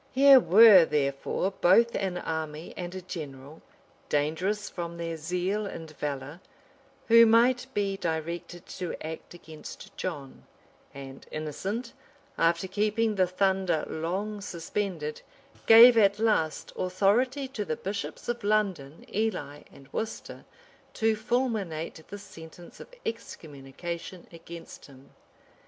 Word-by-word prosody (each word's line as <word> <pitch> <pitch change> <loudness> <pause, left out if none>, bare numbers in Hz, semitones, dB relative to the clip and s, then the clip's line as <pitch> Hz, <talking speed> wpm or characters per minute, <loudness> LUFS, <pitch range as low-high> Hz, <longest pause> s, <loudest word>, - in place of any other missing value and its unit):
Here 275 0 +8
were 200 -1 +8
therefore 145 +5 -1
both 210 +6 +4
an 190 -2 -2
army 160 -1 -5
and 180 0 -6
a 185 - -7
general, 145 -4 -8 0.5
dangerous 175 +8 -1
from 170 -1 -6
their 165 -1 -4
zeal 180 +6 -2
and 165 -4 -8
valor, 145 +2 -5 0.7
who 230 0 +8
might 245 +3 +4
be 200 -1 0
directed 170 +1 -4
to 180 -2 -5
act 160 +2 -8
against 160 -3 -11
John; 145 -7 -6 0.5
and 135 -1 -11
Innocent, 195 - -4 0.4
after 170 +2 +1
keeping 215 +3 0
the 185 -3 +2
thunder 190 -2 0
long 195 +6 -3
suspended, 170 -4 -4 0.5
gave 235 +2 +10
at 200 -3 +4
last 210 -8 0
authority 225 +9 +1
to 230 -6 -4
the 155 -6 -3
bishops 200 +1 -5
of 240 -2 -3
London, 190 -9 -1
Ely, 180 -10 -2
and 135 - -16
Worcester, 220 0 -5 0.5
to 225 0 +2
fulminate 215 -10 -2
the 205 - -8
sentence 170 -3 -13
of - - -10 0.2
excommunication 170 -3 -7
against 165 0 -11
him. 135 -1 -17
180 Hz, 120 wpm, -28 LUFS, 160-210 Hz, 0.7 s, gave